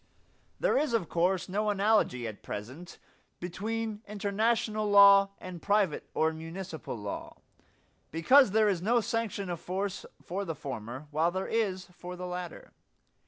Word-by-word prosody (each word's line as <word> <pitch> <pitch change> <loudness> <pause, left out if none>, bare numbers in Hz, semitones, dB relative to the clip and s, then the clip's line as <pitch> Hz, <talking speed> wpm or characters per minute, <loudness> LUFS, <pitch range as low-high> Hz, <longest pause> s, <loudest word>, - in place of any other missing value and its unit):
There - - +3
is 295 -4 0
of 185 -9 -1
course 180 +2 +1
no 210 +3 0
analogy 200 - +2
at 105 -2 -8
present 130 +12 -7 0.4
between 215 +4 -3
international 215 +1 0
law 200 -1 +8
and 180 -2 -8
private 200 -5 +1
or 160 0 +2
municipal 165 -4 -6
law, 105 -1 -6 0.7
because 255 - +5
there 215 +2 +3
is 190 -4 +1
no 235 +6 +3
sanction 220 -3 -2
of 175 -2 -4
force 195 +3 -3
for 190 +3 -4
the 165 -5 -4
former, 130 0 -6
while 160 +3 +2
there 185 +2 -3
is 195 -5 -1
for 180 +1 -8
the 180 0 -6
latter. 180 -1 -6
190 Hz, 145 wpm, -30 LUFS, 165-210 Hz, 0.7 s, law